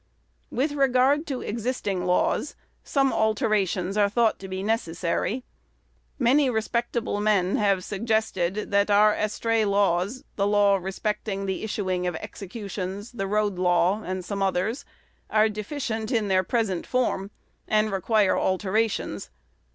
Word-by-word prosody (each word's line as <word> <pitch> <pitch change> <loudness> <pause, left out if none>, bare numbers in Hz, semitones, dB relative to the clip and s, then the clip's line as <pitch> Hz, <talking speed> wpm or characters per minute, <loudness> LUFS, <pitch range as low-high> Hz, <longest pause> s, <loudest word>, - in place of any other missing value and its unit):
With 280 +5 0
regard 275 +2 +2
to 270 -4 -3
existing 210 -5 -2
laws, 180 +10 +1 0.3
some 270 -3 +1
alterations 215 -4 +1
are 205 -1 +4
thought 225 +1 +2
to 190 - -8
be 190 0 -4
necessary. 205 +2 -1 0.7
Many 270 +2 +3
respectable 235 -1 -1
men 200 -3 +2
have 195 -3 +2
suggested 210 -2 -1
that 200 +1 +3
our 210 +1 +5
estray 220 +1 0
laws 200 +3 +1
the 200 0 +2
law 205 -1 +4
respecting 195 +1 -3
the 190 +1 -3
issuing 185 -4 -1
of 175 - -2
executions, 200 +2 -6
the 195 -5 -3
road 205 -2 0
law, 180 +3 +2
and 185 0 -4
some 200 +1 -4
others 195 +6 0 0.4
are 215 0 +4
deficient 220 +1 -4
in 220 -5 +1
their 185 -1 +4
present 195 -3 -1
form, 235 -6 0 0.4
and 215 0 +2
require 200 +1 +2
alterations. 205 +3 -1
210 Hz, 130 wpm, -25 LUFS, 190-225 Hz, 0.7 s, our